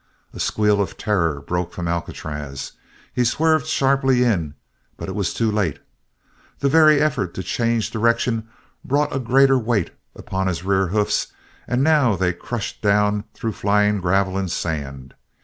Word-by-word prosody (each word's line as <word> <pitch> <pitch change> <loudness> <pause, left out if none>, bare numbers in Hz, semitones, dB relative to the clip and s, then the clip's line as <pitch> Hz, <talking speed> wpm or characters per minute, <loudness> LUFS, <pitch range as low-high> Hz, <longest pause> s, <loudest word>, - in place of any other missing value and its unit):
A - - -9
squeal 105 -1 +2
of 95 - -4
terror 85 -9 0
broke 90 +4 -3
from 85 -1 -4
Alcatraz. 75 -4 -5 0.4
He 125 - +1
swerved 155 +5 +2
sharply 135 -3 +2
in, 85 -11 0 0.4
but - - -6
it 95 - -4
was 100 -1 -1
too 115 -2 0
late. 95 -8 0 0.8
The 140 - +1
very 155 0 +6
effort 140 - 0
to 95 - -4
change 115 +3 0
direction 115 0 0 0.4
brought 145 +2 0
a - - 0
greater 135 +2 +4
weight 110 -6 0 0.2
upon 95 0 -3
his 85 -2 -2
rear 95 -1 +1
hoofs 105 +3 0 0.4
and 125 +2 +1
now 145 -8 +4
they 90 -1 0
crushed 115 +4 -5
down 105 0 +2
through 115 - -3
flying 105 0 +1
gravel 95 +1 +1
and 95 -2 -2
sand. 70 -6 -4
105 Hz, 155 wpm, -21 LUFS, 90-125 Hz, 0.8 s, very